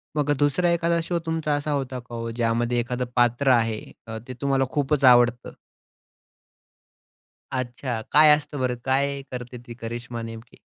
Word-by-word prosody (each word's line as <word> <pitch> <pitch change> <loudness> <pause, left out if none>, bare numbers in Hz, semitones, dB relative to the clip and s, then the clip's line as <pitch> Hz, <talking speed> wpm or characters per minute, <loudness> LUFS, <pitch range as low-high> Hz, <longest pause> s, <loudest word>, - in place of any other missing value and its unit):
मग 145 -1 +1
2रा 145 +5 +2
एखादा 170 0 +1
शो 170 0 -1
तुमचा 160 -2 0
असा 145 +1 -2
होता 130 -3 -2
का 120 -1 -10
ओ, 115 0 -4
ज्यामध्ये 120 +1 0
एखादं 125 +1 -2
पात्र 120 +3 +2
आहे 115 -3 +2 0.3
अ, 110 0 -5
ते 130 - -6
तुम्हाला 135 -1 +2
खूपच 145 0 0
आवडतं? 120 -1 +5 2.0
अच्छा. 125 -1 -3
काय 150 0 +7
असतं 150 -1 -7
बरं? 125 -1 0
काय 140 +1 0
करते 125 -1 -7
ती 120 - -8
करिश्मा 120 0 -6
नेमकी? 115 +1 -9
125 Hz, 150 wpm, -24 LUFS, 120-145 Hz, 2.0 s, काय